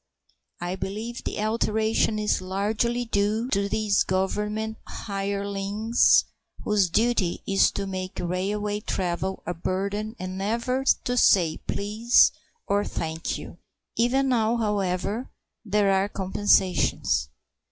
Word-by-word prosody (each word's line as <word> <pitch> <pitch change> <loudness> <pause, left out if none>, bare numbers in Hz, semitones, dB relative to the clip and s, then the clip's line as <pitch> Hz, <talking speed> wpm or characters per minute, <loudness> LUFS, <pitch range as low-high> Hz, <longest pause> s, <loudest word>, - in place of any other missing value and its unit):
I 175 +1 -3
believe 215 +5 -5
the - - -3
alteration 220 0 +1
is 210 -3 0
largely 215 +6 -1
due 215 +2 0
to 200 -3 0
these 210 -1 +1
Government 210 +4 -1
hirelings 200 +2 +1 0.4
whose 205 -4 +2
duty 220 -3 +1
it - - -4
is 195 - +5
to 195 - -3
make 185 0 -5
railway 205 +4 -2
travel 190 -2 -3
a 175 - -2
burden 200 +5 -3
and 185 +1 -5
never 235 +6 -1 0.2
to 245 - -1
say 175 -9 +4
"Please" 215 +4 +3 0.3
or 200 0 +1
"Thank 160 -2 -3
you." - - -10 0.4
Even 260 +4 +2
now, 230 -1 +2
however, 205 +1 -1 0.3
there 205 -2 +2
are 195 +1 +2
compensations. 185 - +1
205 Hz, 120 wpm, -25 LUFS, 190-220 Hz, 0.4 s, is